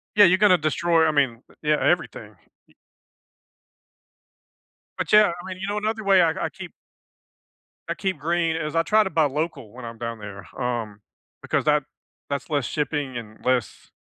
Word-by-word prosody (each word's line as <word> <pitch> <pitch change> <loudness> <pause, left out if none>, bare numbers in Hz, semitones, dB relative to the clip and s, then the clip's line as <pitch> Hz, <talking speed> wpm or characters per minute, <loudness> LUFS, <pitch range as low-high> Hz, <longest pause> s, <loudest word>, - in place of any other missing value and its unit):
Yeah, 205 - +8
you're 185 +2 +4
gonna 195 -3 +5
destroy, 160 +1 +2
I - - +3
mean, 135 -5 +1 0.2
yeah, 150 0 +2
everything. - - -1 0.3
Y - - -26 2.2
But, - - -3
yeah, 210 -2 +7
I - - -11
mean, 185 -1 -6
you 195 - -3
know, 205 +1 -2
another 220 0 -2
way 195 -2 +5
I - - +4 0.2
I - - -3
keep - - -10 1.2
I - - -1
keep 190 -5 -2
green 165 +1 0
is 155 0 -3
I 165 - +4
try 215 +4 +4
to 190 - -3
buy 160 -2 +3
local 145 -5 -3
when 125 0 -10
I'm 115 -1 -8
down 115 -1 -5
there, 100 -2 -9
um, 115 -4 -3 0.4
because - - -1
that 150 -1 +3 0.5
that's 140 -2 -3
less 145 -4 0
shipping 145 -2 -2
and 110 -1 -11
less, 125 -3 -1
150 Hz, 175 wpm, -24 LUFS, 125-180 Hz, 2.2 s, Yeah